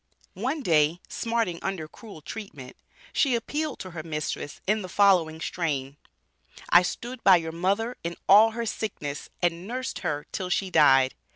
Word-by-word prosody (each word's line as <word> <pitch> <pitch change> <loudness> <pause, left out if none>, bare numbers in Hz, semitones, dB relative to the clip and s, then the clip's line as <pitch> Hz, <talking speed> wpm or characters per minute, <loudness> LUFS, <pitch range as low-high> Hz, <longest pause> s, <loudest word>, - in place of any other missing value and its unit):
One 265 +10 -2
day 160 -1 +3
smarting 230 -7 -1
under 185 -5 -3
cruel 200 -1 -12
treatment, 145 - -8 0.4
she 265 -4 +3
appealed 295 +5 -3
to 185 - -7
her 165 -2 -6
mistress 150 -2 -4
in 210 +2 +1
the 185 - -7
following 180 -5 +3
strain: 145 -5 -3 0.7
"I 175 - +8
stood 240 +7 -5
by 190 - +8
your 160 -1 -4
mother 200 +8 -1
in 170 +1 -3
all 210 +3 +8
her 235 0 -3
sickness 150 -10 -4
and 175 +1 0
nursed 255 +3 -4
her 150 -5 -3
till 185 -1 -4
she 185 +1 -1
died!" 135 -5 +5
180 Hz, 160 wpm, -26 LUFS, 160-220 Hz, 0.7 s, I